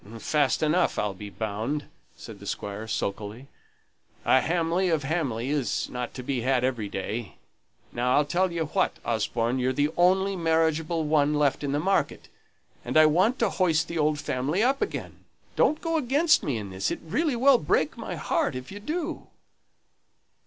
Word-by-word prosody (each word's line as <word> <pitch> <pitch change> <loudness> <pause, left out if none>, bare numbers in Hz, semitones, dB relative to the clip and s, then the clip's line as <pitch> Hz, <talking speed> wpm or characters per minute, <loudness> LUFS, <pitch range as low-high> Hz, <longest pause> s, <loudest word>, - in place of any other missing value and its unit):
"Fast 145 +3 +1
enough, 155 +4 +2
I'll 105 -1 0
be 100 +2 -8
bound," 110 +8 -3 0.3
said - - -11
the - - -10
Squire, 105 +2 -5
sulkily. 105 +3 -4 0.8
"A 130 - +5
Hamley 170 +3 +1
of 160 -3 +1
Hamley 135 -5 -1
isn't 125 -3 -2
to 125 - -6
be 130 -1 -2
had 130 0 +1
every 120 -6 -1
day. 105 +3 -4 0.6
Now, 125 +1 +1
I'll 145 - +3
tell 180 +5 +1
you 165 -1 -1
what, 150 - 0
Osborne, 115 +2 0
you're 130 +1 +1
the 145 +2 +1
only 190 +2 +3
marriageable 160 -1 +1
one 150 -1 +2
left 145 -1 +1
in 140 - -1
the 145 - 0
market, 195 +5 0 0.5
and - - 0
I 155 - +8
want 185 +11 +3
to 230 - +2
hoist 165 -4 +1
the 170 -1 -3
old 150 0 +2
family 140 - -1
up 270 +2 +2
again. - - -4 0.3
Don't 305 - +2
go 330 -1 0
against 300 +4 +3
me 135 -5 -2
in 100 -3 -6
this; 95 +1 -1
it - - -3
really 285 - 0
will 260 +1 +5
break 425 - +1
my - - -6
heart 320 - -1
if 130 +5 -7
you 205 - -7
do." 320 +9 -4
150 Hz, 175 wpm, -26 LUFS, 125-185 Hz, 0.8 s, I